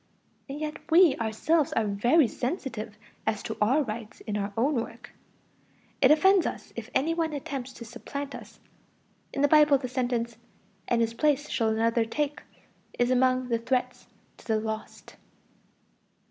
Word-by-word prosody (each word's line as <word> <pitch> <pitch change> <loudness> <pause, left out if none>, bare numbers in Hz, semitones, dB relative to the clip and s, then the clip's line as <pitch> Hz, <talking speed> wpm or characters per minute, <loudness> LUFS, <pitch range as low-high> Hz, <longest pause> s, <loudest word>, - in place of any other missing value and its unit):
And 280 +2 -5
yet 305 0 -4
we 340 -1 +6
ourselves 260 +7 +1
are 225 - +1
very 240 +9 +3
sensitive 230 - -4 0.3
as 215 - 0
to - - -4
our 260 +9 +3
rights 225 -2 -7
in 210 - -4
our 205 0 -2
own 270 +7 +2
work; 235 -1 -5 0.9
it 260 - +6
offends 380 +5 +5
us - - -7
if 235 0 -7
any 305 +5 +2
one 325 -2 -1
attempts 270 -2 -5
to 235 - -10
supplant 280 +4 -6
us; - - -11 0.7
in 275 - -1
the - - +6
Bible 300 -1 +6
the 260 -1 -5
sentence, 245 -2 -2 0.5
"And 235 -1 +2
his 230 0 0
place 295 +3 +1
shall 225 -2 +1
another 225 +1 +2
take" 295 +5 -2 0.6
is 245 +1 +2
among 255 0 +2
the 230 -1 +1
threats 250 +2 -2 0.3
to - - -17
the 220 -2 +2
lost. 220 0 -6
250 Hz, 160 wpm, -27 LUFS, 230-290 Hz, 0.9 s, we